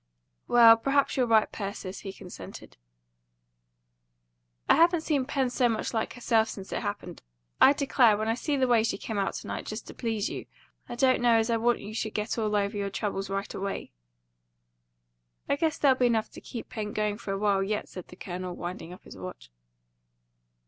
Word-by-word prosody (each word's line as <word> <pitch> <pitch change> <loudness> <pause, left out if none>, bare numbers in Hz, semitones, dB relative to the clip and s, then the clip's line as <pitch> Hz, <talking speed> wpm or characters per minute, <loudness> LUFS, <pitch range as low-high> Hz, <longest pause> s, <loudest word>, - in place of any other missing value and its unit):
"Well, 230 -1 +8
perhaps 275 +4 +1
you're 255 -2 +2
right, 220 -2 +4
Persis," 195 -2 -5
he 195 - -6
consented. 180 - -11 1.9
"I - - +6
haven't 340 0 +4
seen 290 -5 0
Pen 265 -3 0
so 245 -1 +2
much 225 +1 -2
like 220 -1 -1
herself 225 -2 +1
since 195 -3 -8
it - - -2
happened. - - -5 0.4
I 275 - +8
declare, 260 -6 +3
when 215 +1 -2
I 225 - +2
see 285 +4 -1
the 260 -1 +2
way 235 -2 +4
she 225 - -1
came 220 -3 -4
out 195 - -1
to - - -6
night, - - -5
just 215 +2 -5
to - - -10
please 225 -3 -2
you, - - -6 0.4
I - - -5
don't 255 0 +3
know 240 -1 +5
as 225 +1 +1
I 230 - +2
want 240 +1 +1
you 210 +2 -8
should 220 -1 -3
get 215 +2 -2
over 210 -1 +1
all 200 - -1
your 200 -2 -3
troubles 195 -1 -3
right 195 0 -3
away." 195 0 -4 1.6
"I 280 - +2
guess 315 +1 0
there'll 265 -3 +3
be 250 - +4
enough 225 -2 0
to - - -11
keep 235 - -8
Pen 210 -2 -5
going 210 0 -1
for 205 - -5
a - - -2
while 200 -1 +2
yet," 210 +2 -2
said 185 - -9
the - - -13
Colonel, 180 -1 -6
winding 175 -1 -6
up 180 - -12
his - - -12
watch. 180 - -9
220 Hz, 200 wpm, -28 LUFS, 200-245 Hz, 1.9 s, Well